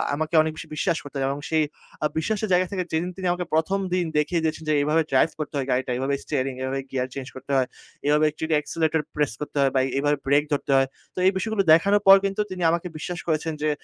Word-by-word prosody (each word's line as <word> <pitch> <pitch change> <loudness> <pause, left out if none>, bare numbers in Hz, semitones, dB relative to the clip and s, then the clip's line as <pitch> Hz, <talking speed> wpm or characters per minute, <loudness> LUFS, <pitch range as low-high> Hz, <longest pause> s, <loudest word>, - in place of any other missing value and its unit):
আমাকে 155 +2 -2
অনেক 155 0 -1
বেশি - - -8
বিশ্বাস 165 +2 0
করতেন 140 -1 -5
এবং 140 +1 -2
সেই 160 -1 +3 0.4
আ - - +3
বিশ্বাসের 210 +5 -1
জায়গা 180 0 +3
থেকে 185 -2 -1
যেদিন 165 +3 0
তিনি 185 - -2
আমাকে 180 0 -2
১ম 175 +5 +2
দিন 180 -1 +1
দেখিয়ে 160 +3 +1
দিয়েছেন 160 0 -2
যে, 155 - +3
এভাবে 155 +3 +2
ড্রাইভ 135 +4 +4
করতে 150 0 -4
হয় 135 -1 -2
গাড়িটা, 125 0 0
এভাবে 135 +2 -1
স্টিয়ারিং, 135 -3 -1
এভাবে 135 +1 -2
গিয়ার 130 -1 -1
চেঞ্জ 135 -2 -6
করতে 135 +2 -8
হয়। 130 -1 +2 0.4
এভাবে 150 +1 +4
টিট 160 0 -3
অ্যাক্সিলারেটর 160 +1 0
প্রেস 150 -4 +1
করতে 150 0 -5
হয় 135 -1 +3
বা 130 - +4 0.2
এভাবে 145 0 +1
ব্রেক 145 +2 +4
ধরতে 140 -1 -1
হয়। 135 0 +3 0.3
তো - - -33
এই 190 - +6
বিষয়গুলো 215 0 0
দেখানোর 200 +5 +4
পর 195 - +11
কিন্তু 195 +2 0
তিনি 185 - -5
আমাকে 170 +1 -1
বিশ্বাস 175 +3 -5
করেছেন 160 0 0
যে, 155 - +1
155 Hz, 230 wpm, -24 LUFS, 140-175 Hz, 0.4 s, পর